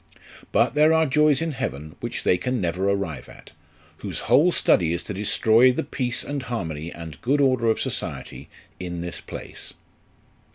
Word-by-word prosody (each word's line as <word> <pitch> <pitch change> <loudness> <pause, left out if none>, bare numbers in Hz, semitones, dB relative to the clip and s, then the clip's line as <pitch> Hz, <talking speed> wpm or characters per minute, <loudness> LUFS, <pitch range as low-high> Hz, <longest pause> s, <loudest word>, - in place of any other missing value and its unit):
But - - +3
there 155 +2 +5
are 160 0 +4
joys 150 +1 +3
in 165 - -2
heaven 75 - -5
which - - -4
they - - +4
can 125 +8 -2
never 90 +2 0
arrive 100 -8 -3
at, - - -15 0.5
whose - - -5
whole 170 +6 +4
study 85 - +2
is 85 - -3
to 105 - -6
destroy 110 +5 +4
the 125 - -2
peace 125 -3 -2
and 145 -1 -4
harmony 85 - -4
and 80 -2 -9
good 140 +4 +1
order 130 -4 +3
of 110 - +1
society - - -5 0.3
in 90 -2 -5
this 85 0 -6
place." - - -10
115 Hz, 170 wpm, -24 LUFS, 85-135 Hz, 0.5 s, there